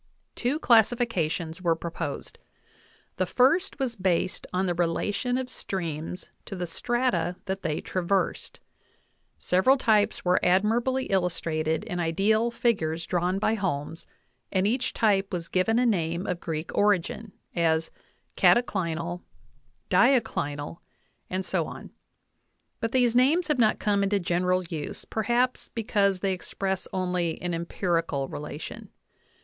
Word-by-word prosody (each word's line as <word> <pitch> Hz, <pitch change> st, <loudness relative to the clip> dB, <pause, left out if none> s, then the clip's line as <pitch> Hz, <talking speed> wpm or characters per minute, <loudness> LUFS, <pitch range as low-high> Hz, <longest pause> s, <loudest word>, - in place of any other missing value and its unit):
Two 250 Hz, +5 st, -1 dB
classifications 215 Hz, -, +2 dB
were 170 Hz, -2 st, +2 dB
pro 170 Hz, +1 st, -6 dB
posed; 155 Hz, -4 st, -5 dB, 0.8 s
the 185 Hz, -, 0 dB
first 275 Hz, -, +3 dB
was 260 Hz, -4 st, -1 dB
based 185 Hz, -2 st, 0 dB
on 185 Hz, +1 st, 0 dB
the 175 Hz, -, +1 dB
relation 190 Hz, +8 st, 0 dB
of 260 Hz, -1 st, -2 dB
streams 170 Hz, -6 st, -5 dB
to 195 Hz, -, -6 dB
the 180 Hz, -1 st, -3 dB
strata 180 Hz, -1 st, 0 dB
that 195 Hz, 0 st, -3 dB
they 155 Hz, -1 st, -1 dB
traversed; 185 Hz, +1 st, -1 dB, 0.8 s
several 190 Hz, +10 st, +3 dB
types 215 Hz, -6 st, +2 dB
were 180 Hz, +1 st, +3 dB
admirably 230 Hz, +8 st, +2 dB
illus 180 Hz, -2 st, +1 dB
trated 155 Hz, -1 st, -1 dB
in 180 Hz, -, -4 dB
ideal 200 Hz, +7 st, +2 dB
figures 170 Hz, -9 st, 0 dB
drawn 180 Hz, +1 st, 0 dB
by 215 Hz, +2 st, +1 dB
Holmes, 165 Hz, -6 st, -3 dB, 0.4 s
and 190 Hz, 0 st, +1 dB
each 245 Hz, +5 st, +1 dB
type 200 Hz, -4 st, +2 dB
was 170 Hz, -2 st, -3 dB
given 190 Hz, +6 st, +1 dB
a 250 Hz, -, +3 dB
name 170 Hz, -5 st, 0 dB
of 180 Hz, -2 st, -2 dB
Greek 160 Hz, -1 st, -4 dB
origin, 205 Hz, +1 st, +1 dB, 0.2 s
as 160 Hz, -2 st, +1 dB, 0.4 s
cataclinal, 175 Hz, -7 st, +2 dB, 0.7 s
diaclinal, 165 Hz, -, +2 dB, 0.5 s
and 185 Hz, 0 st, -2 dB
so -, -, 0 dB
on; -, -, -9 dB, 0.9 s
but 225 Hz, -2 st, -2 dB
these 245 Hz, -2 st, +3 dB
names 305 Hz, +7 st, +3 dB
have 295 Hz, -4 st, +1 dB
not 215 Hz, -2 st, +4 dB
come 205 Hz, -1 st, +1 dB
into 200 Hz, 0 st, +2 dB
general 180 Hz, +1 st, +1 dB
use, 160 Hz, -4 st, -6 dB
perhaps 240 Hz, +3 st, 0 dB
because 200 Hz, -4 st, +1 dB
they 195 Hz, -1 st, +1 dB
express 190 Hz, +1 st, -3 dB
only 180 Hz, -3 st, -1 dB
an 175 Hz, -1 st, -3 dB
empirical 165 Hz, -4 st, -1 dB
relation. 150 Hz, +2 st, -7 dB
185 Hz, 130 wpm, -27 LUFS, 170-225 Hz, 0.9 s, not